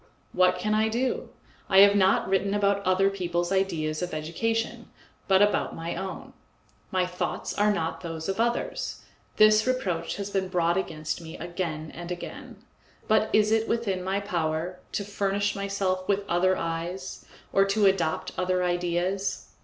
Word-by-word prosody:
What 180 0 +4
can 210 +4 -1
I 220 +1 +2
do? 245 +4 -1 0.4
I 190 0 +7
have 200 0 +7
not 190 -1 +3
written 195 +1 +1
about 200 -1 +2
other 185 +1 +3
people's 175 -2 -2
ideas 165 -5 0
of 175 -2 -3
education, 225 +9 -2 0.4
but 195 +1 +5
about 205 - +1
my 165 +1 -4
own. 190 -1 -6 0.6
My 185 -1 +1
thoughts 180 0 -3
are 210 +1 +3
not 165 -5 -2
those 165 -2 -5
of 195 +2 -2
others; 240 - -1 0.3
this 215 +1 +5
reproach 185 -10 -1
has 200 0 -5
been 190 -1 0
brought 175 -2 +1
against 155 -4 -3
me 160 -1 -9
again 165 -3 -4
and 175 +1 -7
again. 175 - -7 0.5
But 220 0 +3
is 215 0 +4
it 225 0 +2
within 200 -6 -1
my 190 +2 0
power 175 -2 -2
to 205 - -1
furnish 200 0 -1
myself 195 -2 -1
with 200 0 0
other 185 +1 +2
eyes, 170 +3 -4 0.3
or 195 - +5
to 200 +1 +2
adopt 175 -5 +1
other 185 0 +1
ideas? 180 +2 -1
190 Hz, 160 wpm, -27 LUFS, 175-200 Hz, 0.6 s, I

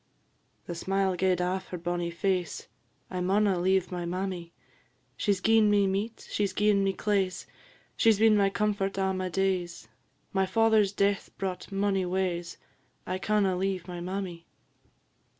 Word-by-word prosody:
"The 175 - -5
smile 190 +2 0
gaed 180 0 +1
aff 185 +1 -1
her 180 - -5
bonnie 175 0 -2
face 185 - -2 0.4
'I 180 -1 -2
maunna 195 0 +2
leave 190 +1 +1
my 175 -1 -3
mammy; 180 -1 -4 0.6
She 205 - 0
's 190 -2 0
gi'en 220 0 +4
me 205 -1 +4
meat, 200 +4 -3
she 210 - -1
's - - -8
gi'en 205 -1 +3
me 195 - +2
claise, 195 -2 -1 0.5
She 225 - +5
's 215 - +2
been 220 0 +5
my 200 -1 +4
comfort 195 -1 -1
a' 190 0 +1
my 185 0 -2
days; 180 -7 -1 0.5
My 190 -1 +2
father's 220 -2 +3
death 200 -1 0
brought 190 0 -4
mony 195 -1 0
waes 180 -2 -2 0.5
I 185 0 -3
canna 200 -2 +1
leave 185 -1 -2
my 175 -1 -6
mammy.'" 180 -2 -5
190 Hz, 160 wpm, -28 LUFS, 180-200 Hz, 0.6 s, She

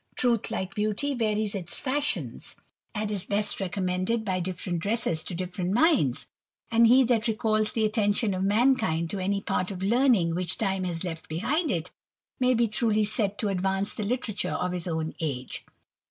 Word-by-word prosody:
Truth, 235 -3 +1
like 190 -2 -3
beauty, 215 +7 0
varies 215 -4 0
its 180 -4 -3
^shions, 285 +2 -2 0.4
and 210 0 -2
is 200 -3 -3
best 205 0 -1
recommended 185 +4 -1
by 185 -2 0
different 180 -1 -3
dresses 200 -5 0
to 175 - -4
different 180 +1 -3
minds; 245 - +3 0.5
and 230 0 +6
he 255 +3 +6
that 235 -3 +1
recalls 215 -1 +1
the 220 -1 +1
attention 210 0 +1
of 185 - -2
man 235 +7 +4
*^^nd 165 -7 -1
to 200 - -3
any 200 +2 0
part 180 -2 -1
of 190 -2 -5
learning 225 -6 +3
which 175 0 -1
time 195 -3 -1
has 170 -1 -3
left 165 -3 -6
behind 275 - 0
it, 175 -4 -2 0.5
'^ay 250 -1 +3
be 235 0 +3
truly 215 0 +2
said 205 -1 +1
to 215 -5 0
advance 195 +2 0
the - - -5
literature 215 -1 -2
of 180 - -1
his 180 -1 -4
own 160 -1 -2
age. 135 -6 -4
205 Hz, 180 wpm, -27 LUFS, 180-225 Hz, 0.5 s, and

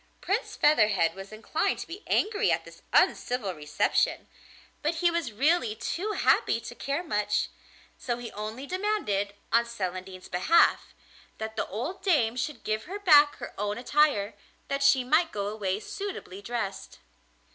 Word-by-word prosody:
Prince 395 +6 -2
Featherhead 210 - +3
was 195 +1 -10
inclined 215 +1 -1
to - - -6
be 355 +5 -9
angry 420 -1 +2
at - - 0
this - - -14
uncivil 235 -7 +2
reception, 150 -2 0 0.5
but 310 +3 0
he 345 +1 +2
was 335 -8 -2
really 255 -1 +2
too 385 - -3
happy 230 - +2
to 235 +1 -8
care 280 +6 -3
much, 210 - 0 0.5
so 240 -2 -2
he 240 -1 -7
only 215 +6 -6
demanded, 360 - -1 0.2
on 235 +1 +5
Celandine's 185 -5 -6
behalf, 190 - +3 0.4
that 220 0 -5
the - - -2
old 255 - -5
dame 265 - +2
should 255 +1 -4
give 215 0 -2
her 385 +3 -5
back 300 -7 +6
her - - -8
own 205 0 -1
attire, 245 -5 +2 0.4
that 275 0 -1
she 280 -2 +5
might 310 +6 +2
go 200 -1 -3
away 205 -2 -2
suitably 295 - -6
dressed. 215 -2 -4
235 Hz, 155 wpm, -28 LUFS, 205-310 Hz, 0.5 s, back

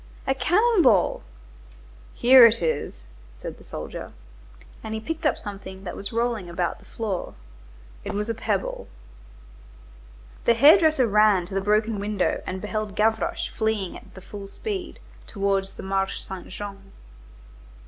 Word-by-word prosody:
"A 270 - +2
cannon 375 - +3
ball." - - +3 0.9
"Here 255 +1 +8
it 230 0 0
is," - - -2 0.3
said - - -8
the - - -15
soldier. - - -7 0.7
And 220 0 -4
he - - -3
picked 320 +7 -2
up - - +1
something 195 -2 -8
that 180 - -6
was 200 - -6
rolling 230 -5 -1
about 170 0 -2
the - - -19
floor. 210 -5 -4 0.7
It - - -5
was 210 +1 -2
a 230 - -1
pebble. 210 -3 -2 1.6
The 235 - +5
hair 295 - +8
dresser 310 -6 +3
ran 210 -4 +4
to 190 - -10
the 195 - 0
broken 210 +1 +1
window 205 -2 -1
and 185 0 -4
beheld 210 -1 -4
Gavroche 220 +1 0
fleeing 220 -4 -1
at - - -14
the 190 - -10
full 200 +1 -9
speed, 385 - -5 0.3
towards 195 -1 -1
the - - -9
Marché 195 0 -1
Saint 190 -1 -8
Jean. 195 0 -9
210 Hz, 150 wpm, -24 LUFS, 195-230 Hz, 1.6 s, Here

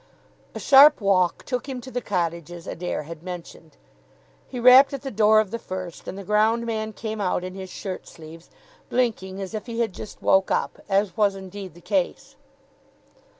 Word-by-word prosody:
A - - -4
sharp 290 +2 +7
walk 190 -4 +2
took 250 +1 -3
him 260 -2 -4
to 260 - -10
the 245 - -2
cottages 170 -3 -3
Adair 175 -2 -4
had 160 +1 -9
mentioned. 170 -3 -9 0.7
He 250 - -6
rapped 255 +4 +7
at 275 - -5
the 270 - -4
door 215 0 +5
of 215 -3 -1
the 230 - -3
first, 185 -4 -7
and 190 - -6
the 200 - -7
ground 215 +3 +2
man 220 -1 -3
came 220 -1 -5
out 180 -2 0
in 185 0 -6
his 190 -1 -8
shirt 185 -1 -6
sleeves, 165 +1 -13 0.4
blinking 215 -6 -1
as 195 +1 -6
if 215 +2 -5
he 230 -1 -5
had 225 -5 0
just 215 - -9
woke 190 0 +3
up, - - -1
as 195 -2 +1
was 205 -2 +2
indeed 190 -2 -9
the 175 - -15
case. 275 - -2
200 Hz, 190 wpm, -24 LUFS, 185-235 Hz, 0.7 s, sharp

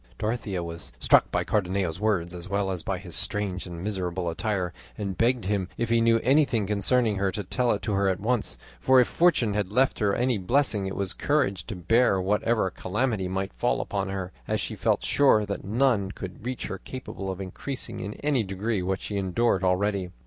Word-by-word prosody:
Dorothea 105 - -2
was 85 -4 -6
struck - - +4
by - - 0
Cardenio's 95 -4 0
words 95 -5 0
as 90 +1 -8
well 100 -1 0
as 90 -2 -3
by 95 +2 -2
his 90 -3 -8
strange 100 -3 -2
and 85 0 -7
miserable 95 -3 -2
attire, 95 -1 -2 0.2
and 100 -2 -3
begged 120 0 +2
him 95 -2 -1
if 115 -1 -1
he 115 0 +4
knew 115 0 +4
anything 130 -5 +3
concerning 105 +2 +2
her 95 0 +1
to 105 - -4
tell 120 +6 +1
it 100 -2 -1
to 105 - -1
her 100 0 +2
at 95 -1 -1
once, 115 +1 -1 0.2
for 130 0 +5
if 125 - +4
fortune 165 -11 +3
had 100 -2 -1
left 130 +5 +2
her 100 -3 +2
any 125 -3 +1
blessing 105 -1 +1
it 95 - -4
was 100 -1 -2
courage 115 -11 0
to 110 - -4
bear 100 +3 +3
whatever 105 +1 +1
calamity 105 -2 -1
might 95 +1 -3
fall 120 - 0
upon 100 -1 -2
her, 95 -1 -4 0.2
as - - 0
she - - -3
felt - - +1
sure 120 -7 +4
that 100 0 -4
none 110 -2 +2
could 95 +3 -8
reach 130 -1 -3
her - - -5
capable 125 -6 -6
of 95 0 -4
increasing 100 +8 -5
in 100 +2 -5
any 145 -4 +2
degree 100 +2 -2
what 95 +1 -1
she 105 - -4
endured 95 +1 +1
already. 95 0 +1
100 Hz, 205 wpm, -26 LUFS, 95-115 Hz, 0.2 s, for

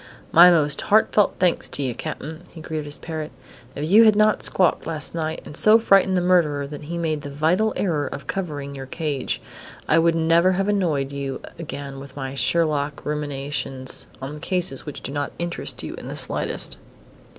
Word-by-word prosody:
"My 175 +2 +9
most 150 -4 +2
heartfelt 210 -1 +3
thanks 180 -2 +1
to 145 - -2
you, 130 -2 -1
Cap'n!" 155 +7 -6
he 165 - -12
greeted 155 -1 -4
his 145 0 -5
parrot. 160 -2 -5 0.5
"If 150 +2 -3
you 210 +6 +7
had 215 -1 +6
not 215 0 +3
squawked 180 -4 +1
last 155 -2 -3
night 160 -1 -3
and 145 - -9
so 215 +6 +6
frightened 195 -4 +4
the - - +2
murderer 165 -6 +2
that 145 +1 -8
he 170 +3 -4
made 155 -3 -1
the 145 - -7
vital 165 +10 +1
error 155 -7 0
of 140 - -7
covering 145 -7 -4
your 135 -1 -7
cage, 145 -2 -3 0.4
I - - +4
should 165 0 +3
never 165 +3 +4
have 195 +2 0
annoyed 165 -10 0
you 140 -1 -4 0.2
again 140 -4 -6
with 135 -1 -11
my 135 -1 -5
Sherlock 150 -1 0
ruminations 140 -3 -2 0.2
on 145 +3 -6
cases 170 -5 -2
which 150 - -6
do - - -4
not 145 0 -3
interest 170 0 -3
you - - -5
in - - -9
the - - -5
slightest." - - -3
155 Hz, 185 wpm, -23 LUFS, 140-175 Hz, 0.5 s, My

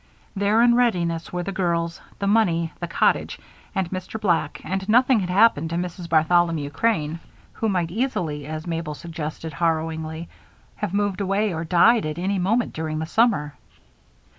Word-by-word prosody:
There, 205 +3 +3
in 240 0 +5
readiness, 175 -9 +1
were 180 0 -2
the 195 - -4
girls, 170 -3 -1 0.2
the 200 - -3
money, 175 -6 +2
the 175 - -3
cottage, - - +1 0.4
and 190 -2 0
Mr. 185 +3 -5
Black, 170 -7 0
and 190 +2 -3
nothing 250 +1 +5
had 180 -2 -3
happened 180 -5 +4
to 165 - -3
Mrs. 175 0 -4
Bartholomew 160 -2 +2
Crane 160 -4 0 0.3
who 225 - -1
might 175 -4 0
easily, 170 - -2
as 155 0 -5
Mabel 165 -3 -3
suggested 160 0 -6
harrowingly, 160 +1 -2 0.5
have - - -3
moved 205 -1 0
away 200 +1 0
or 160 0 -3
died 180 +5 +4
at 155 - -4
any 190 +2 -1
moment 225 +7 +1
during 155 -1 -3
the 160 - -2
summer. 185 -6 +2
175 Hz, 165 wpm, -23 LUFS, 160-200 Hz, 0.5 s, in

